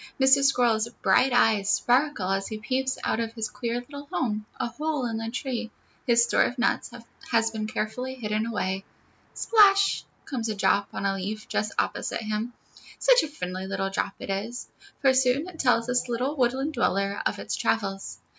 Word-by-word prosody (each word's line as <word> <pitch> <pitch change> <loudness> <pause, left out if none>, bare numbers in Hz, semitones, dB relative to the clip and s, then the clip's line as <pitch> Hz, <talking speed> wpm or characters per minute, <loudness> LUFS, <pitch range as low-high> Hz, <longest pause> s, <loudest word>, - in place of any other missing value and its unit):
Mr. 265 +1 +5
Squirrel's 235 -4 +3
bright 265 +1 +4
eyes 220 -4 +3
sparkle 245 -6 +2
as 195 0 0
he 215 - -5
peeps 260 +4 -1
out - - 0
of 230 -1 -2
his 225 -2 -4
queer 240 0 -3
little 285 +3 -10
home, 215 -4 -1
a - - 0
hole 295 +1 -2
in 225 -2 -2
the 225 0 -3
tree; 240 -2 -3 0.4
his 235 -1 +5
store - - +2
of 245 - +1
nuts 245 - +1 0.4
has 225 -1 +2
been 215 -1 -3
carefully 250 +4 -3
hidden 215 -2 -2
away. 195 -4 -2 0.5
Splash 400 -3 +4 0.2
comes 235 -5 -3
a 215 - -2
drop 200 0 +2
on - - -4
a 195 - +2
leaf 205 +3 -5
just 210 - -1
opposite - - -1
him. 215 +2 -2 0.5
Such - - +5
a - - -3
friendly 185 -10 -5
little 195 0 -2
drop 195 - -1
it - - -5
is, 220 +6 -4 0.3
for 270 -1 +5
soon 260 +4 +2
it 355 -3 -11
tells 245 -3 +3
this 250 0 0
little 250 +5 -1
woodland 265 +3 0
dweller 200 -5 0
of - - -3
all - - -6
its - - -2
travels. 195 -3 -1
235 Hz, 185 wpm, -26 LUFS, 215-260 Hz, 0.5 s, Mr